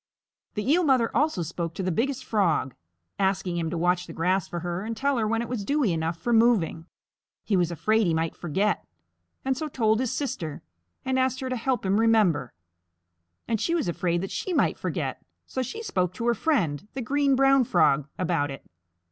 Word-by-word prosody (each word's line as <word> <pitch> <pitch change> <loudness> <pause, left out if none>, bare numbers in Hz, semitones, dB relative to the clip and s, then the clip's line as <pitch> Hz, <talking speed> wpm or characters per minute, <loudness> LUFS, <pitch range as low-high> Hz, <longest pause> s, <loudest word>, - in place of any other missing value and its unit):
The 210 +2 -3
Eel 340 +6 +4
Mother 260 -6 +2
also 295 - +2
spoke 165 0 -4
to 190 - -3
the 185 - 0
Biggest 260 +8 -1
Frog, 170 - +1 0.5
asking 190 -2 0
him 165 -1 -1
to 170 - -3
watch 180 +1 +1
the - - -8
grass 185 +2 +1
for 175 - -5
her 175 +2 -3
and 225 +1 -4
tell 275 0 +1
her 220 - +1
when 225 +1 0
it - - -6
was 240 -5 -3
dewy 270 - +1
enough 165 +1 -2
for 240 +7 -1
moving. 220 -8 +3 0.6
He 210 - 0
was 175 -2 +2
afraid 215 +5 +1
he 165 - +2
might 160 0 -1
forget 190 +4 0
it, - - -36 0.6
and 265 0 +1
so 310 +4 -3
told 220 -6 +1
his 255 -2 0
sister 170 - -4 0.4
and 260 0 +1
asked 260 0 +1
her 260 - -3
to 255 - -1
help 250 -1 -1
him 195 +2 +2
remember. 210 - +3 1.0
And 225 -2 0
she 335 - +1
was 330 - 0
afraid 175 0 0
that 195 - -5
she 375 - -3
might - - +1
forget, - - -3 0.2
so 260 - -3
she 440 - -5
spoke 185 - -1
to 230 - -4
her 240 - +4
friend, 200 - 0
the 265 - -3
Green 280 +2 +2
Brown 270 0 +5
Frog, 150 - +2
about 165 -5 0
it. 135 -1 -8
210 Hz, 205 wpm, -26 LUFS, 175-255 Hz, 1.0 s, Brown